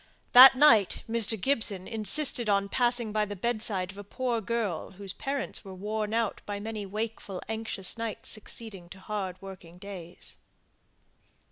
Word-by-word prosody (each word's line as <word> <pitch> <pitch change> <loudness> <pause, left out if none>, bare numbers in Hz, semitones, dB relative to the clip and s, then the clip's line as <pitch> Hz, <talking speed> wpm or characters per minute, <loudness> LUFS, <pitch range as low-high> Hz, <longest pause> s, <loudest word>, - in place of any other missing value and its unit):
That 260 +2 +11
night 235 -9 +5
Mr. 225 -1 0
Gibson 215 -6 0
insisted 230 +2 +1
on 200 0 +2
passing 240 -2 +1
by 215 0 +2
the 205 0 -6
bedside 205 -3 -1
of 195 - -12
a - - -7
poor 240 +2 -2
girl 220 -7 -3
whose 195 0 -4
parents 275 -1 -2
were 190 -2 -9
worn 210 +2 -3
out 225 -2 -1
by 205 -1 -3
many 210 -1 -5
wakeful 210 -2 -4
anxious 220 -2 -4
nights 230 -2 -4
succeeding 215 -4 -5
to 190 - -11
hard 190 -2 -4
working 180 -3 -11
days. 180 -3 -10
215 Hz, 150 wpm, -28 LUFS, 195-230 Hz, -, That